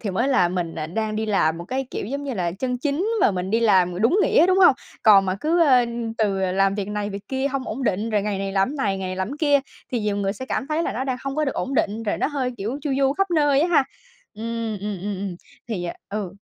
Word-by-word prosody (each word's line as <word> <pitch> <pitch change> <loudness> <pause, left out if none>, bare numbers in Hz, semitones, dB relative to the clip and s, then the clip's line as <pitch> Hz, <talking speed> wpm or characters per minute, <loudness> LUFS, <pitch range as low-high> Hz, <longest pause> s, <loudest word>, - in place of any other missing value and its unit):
thì 210 - -3
mới 235 +8 0
là 250 -10 +3
mình 175 -2 -3 0.2
đang 220 -1 -1
đi 220 +1 -1
làm 165 -6 +1
một 170 - -7
cái, 265 +5 -3
kiểu - - -4
giống 280 +4 -4
như 275 -3 -3
là, 175 -4 -1
chân 250 +6 -3
chính 295 - -1
mà - - +5
mình 185 -1 -3
đi 225 +2 +2
làm 185 -5 +3
đúng 255 - +4
nghĩa, 335 - +4
đúng 370 +1 +3
hông? 360 -7 +7 0.3
Còn 200 -3 +7
mà 185 - 0
cứ, 330 +3 +2
a, 255 -6 +5 0.3
từ 205 -3 +1
làm 195 +1 +2
việc 200 -1 -3
này 210 0 -3
việc 200 0 -8
kia 265 0 -1
hông 270 -1 -3
ổn 255 +5 -4
định, 215 -1 0
rồi 210 -2 +1
ngày 205 -1 -2
này 195 0 -3
làm 195 0 +2
cái 290 - -6
này, 200 -8 0
ngày 190 -1 -4
này 185 - -4
làm 190 +2 -2
cái 280 - -6
kia 290 -2 +3 0.3
thì 240 - 0
nhiều 210 -1 -1
người 195 -1 0
sẽ 260 +6 -8
cảm 265 - -2
thấy 310 +2 0
là - - -2
nó 260 - -3
đang 260 -2 -1
hông 275 +1 -3
có 305 - +2
được 270 - -2
ổn 270 - -3
định, 220 -2 0
rồi 210 - -1
nó - - +1
hơi 265 -4 -2
kiểu 220 +7 -3
chu 290 - -2
du 270 -1 +3
khắp 390 +4 0
nơi 290 -4 +3
á 335 - +2
ha? 320 -6 +4 0.5
Ừm, 230 -1 -4
ừm, 205 -1 -4
ừm, 205 +1 -2
ừm, 190 -2 -4 0.3
thì 195 -6 -3
à 170 - -4
ừ. 200 -3 -4
220 Hz, 285 wpm, -23 LUFS, 195-275 Hz, 0.5 s, hông